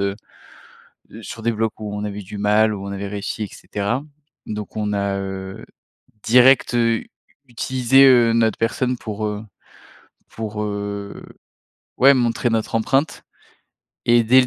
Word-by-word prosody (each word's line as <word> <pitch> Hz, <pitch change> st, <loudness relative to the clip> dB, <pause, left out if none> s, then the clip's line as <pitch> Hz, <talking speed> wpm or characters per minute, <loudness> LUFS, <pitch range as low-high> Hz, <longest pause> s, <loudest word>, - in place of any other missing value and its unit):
heu, 100 Hz, 0 st, -1 dB, 1.0 s
heu, 115 Hz, -, -10 dB
sur 110 Hz, +1 st, -8 dB
des 115 Hz, -, +1 dB
blocs 110 Hz, 0 st, -1 dB
où 105 Hz, -1 st, -5 dB
on 105 Hz, -, -4 dB
avait 105 Hz, 0 st, -5 dB
du 100 Hz, +2 st, -9 dB
mal, 105 Hz, +1 st, +3 dB
où 100 Hz, 0 st, -6 dB
on 100 Hz, -, -5 dB
avait 100 Hz, 0 st, -5 dB
réussi 105 Hz, +2 st, -4 dB
et -, -, -6 dB
cetera. 100 Hz, +9 st, -3 dB, 0.4 s
Donc 105 Hz, -1 st, -6 dB
on 105 Hz, -1 st, -1 dB
a, 100 Hz, -1 st, -1 dB
heu, 95 Hz, 0 st, -6 dB, 0.6 s
direct, 125 Hz, +2 st, +5 dB
heu, 115 Hz, -1 st, +3 dB
u -, -, -12 dB, 0.4 s
utilisé, 130 Hz, +2 st, +3 dB
heu, 120 Hz, -3 st, +6 dB
notre 115 Hz, -2 st, +2 dB
personne 125 Hz, +2 st, 0 dB
pour, 110 Hz, -1 st, -4 dB
heu 105 Hz, 0 st, -4 dB, 0.9 s
pour, 105 Hz, -1 st, -5 dB
heu, 100 Hz, -1 st, -5 dB, 0.8 s
ouais 135 Hz, +2 st, +7 dB
montrer 120 Hz, -1 st, +1 dB
notre 115 Hz, 0 st, -1 dB
empreinte 135 Hz, +7 st, 0 dB, 0.8 s
et 120 Hz, 0 st, +5 dB
dès 130 Hz, +4 st, +6 dB
le 125 Hz, -, +1 dB
110 Hz, 160 wpm, -21 LUFS, 100-120 Hz, 1.0 s, ouais